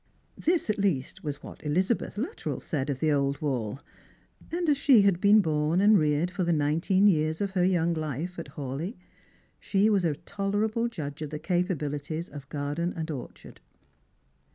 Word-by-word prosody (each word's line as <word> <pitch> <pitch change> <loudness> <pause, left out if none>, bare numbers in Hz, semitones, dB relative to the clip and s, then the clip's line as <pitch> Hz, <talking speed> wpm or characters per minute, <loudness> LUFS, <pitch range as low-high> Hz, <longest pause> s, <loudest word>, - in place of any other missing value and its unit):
Thi?, 345 - +3
at 215 -11 -1
least, 170 -10 -1
was 145 -2 -3
■what - - -12
Elizabeth 185 +10 0
Luttrell 295 - -3
said 145 -4 -3
of 135 -2 -2
the 155 -1 +3
old 140 -1 +1
wall, 130 -5 -2 0.7
and 345 0 -1
as 295 - +4
she 265 -6 +5
had 190 -3 +2
been 210 +1 +6
born 155 0 +1
and 210 +2 +6
reared 155 0 +2
for 185 0 -2
the 170 - +1
nineteen 165 +6 +2
years 160 -5 +3
of 200 -1 -1
her 185 -2 +1
young 175 -2 +2
life 155 +3 -4
at 165 - -6
Hawleigh, 145 - -4 0.6
she 205 +2 +2
was 200 -3 +2
a 160 -4 +1
tolerable 210 +7 -1
judge 155 -10 -6
of 155 - -4
the 150 - -4
capabilities 160 -2 -2
of 140 -1 -10
garden 150 +4 -2
and 160 0 -3
orchard. 135 -5 -9
165 Hz, 175 wpm, -28 LUFS, 150-200 Hz, 0.7 s, been